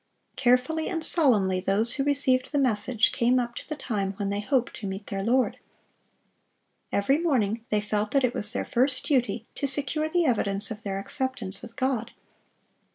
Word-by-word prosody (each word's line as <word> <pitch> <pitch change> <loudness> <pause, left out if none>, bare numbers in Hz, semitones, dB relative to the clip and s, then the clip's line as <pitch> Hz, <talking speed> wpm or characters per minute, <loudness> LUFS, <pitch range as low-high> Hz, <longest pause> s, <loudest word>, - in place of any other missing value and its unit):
Carefully 255 +6 +2
and 325 -2 -3
solemnly 210 - +3
those 200 +5 +1
who 275 - -1
received 270 -3 +2
the 290 - 0
message 235 -3 +2
came 245 +2 +2
up 240 -1 -3
to - - -9
the 305 - -2
time 205 -8 -2
when 200 0 -3
they 200 - -1
hoped 245 +3 0
to 205 - -5
meet 195 +2 -5
their 195 -1 -4
Lord. 250 +4 +1 1.3
Every 270 +9 +2
morning 230 -9 0
they 210 -1 +1
felt 210 0 -1
that 275 +2 +2
it 250 -1 +2
was 210 +1 0
their - - -2
first 255 +1 +1
duty 245 -4 0
to 280 - -2
secure 290 +3 0
the 345 +1 +2
evidence 205 -6 0
of 215 0 -6
their 195 -2 -3
acceptance 210 -3 -3
with 230 -1 -11
God. 260 -4 -1
240 Hz, 180 wpm, -26 LUFS, 205-270 Hz, 1.3 s, solemnly